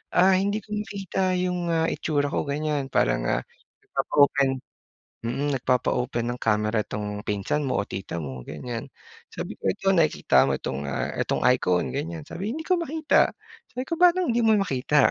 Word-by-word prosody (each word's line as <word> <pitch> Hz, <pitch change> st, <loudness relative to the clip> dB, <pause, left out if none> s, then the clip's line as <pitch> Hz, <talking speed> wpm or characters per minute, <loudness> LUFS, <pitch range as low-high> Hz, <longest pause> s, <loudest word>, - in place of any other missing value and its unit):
ah, 185 Hz, +2 st, +6 dB
hindi 200 Hz, +2 st, +1 dB
ko 210 Hz, -, -8 dB
makita 195 Hz, -3 st, -1 dB
yung 180 Hz, -1 st, -1 dB
ah 165 Hz, 0 st, +2 dB
itsura 145 Hz, -2 st, 0 dB
ko -, -, +1 dB
ganyan 145 Hz, -2 st, -1 dB
para, -, -, +3 dB
ah, -, -, 0 dB, 0.4 s
nagpapa-open 140 Hz, -2 st, +2 dB, 0.8 s
mm, 135 Hz, +5 st, -1 dB
nagpapa-open 125 Hz, -1 st, 0 dB
ng 125 Hz, -, -4 dB
camera 105 Hz, 0 st, +2 dB
tong 105 Hz, 0 st, -4 dB
pinsan 105 Hz, +9 st, -1 dB
mo 130 Hz, -, +1 dB
o -, -, -9 dB
tita 95 Hz, -3 st, -5 dB
mo 65 Hz, -3 st, -6 dB
ganyan. 120 Hz, -2 st, -5 dB, 0.5 s
Sabi -, -, -5 dB
ko, -, -, -6 dB
"Ito 195 Hz, -, 0 dB
nakikita 150 Hz, -, +4 dB
mo -, -, +1 dB
itong, 70 Hz, +2 st, -4 dB
ah, 65 Hz, -, -2 dB
itong -, -, 0 dB
icon?" 90 Hz, -1 st, +1 dB
ganyan. 160 Hz, +2 st, -4 dB
Sabi, 205 Hz, +8 st, -4 dB
"Hindi 320 Hz, -, -4 dB
ko 365 Hz, -2 st, +3 dB
makita," 315 Hz, -1 st, +2 dB, 0.4 s
sabi 250 Hz, +1 st, -4 dB
ko 335 Hz, -, 0 dB
"Paanong 360 Hz, -4 st, +5 dB
hindi -, -, +2 dB
mo 220 Hz, -1 st, +5 dB
makita?" 145 Hz, -5 st, +3 dB
145 Hz, 170 wpm, -25 LUFS, 115-195 Hz, 0.8 s, ah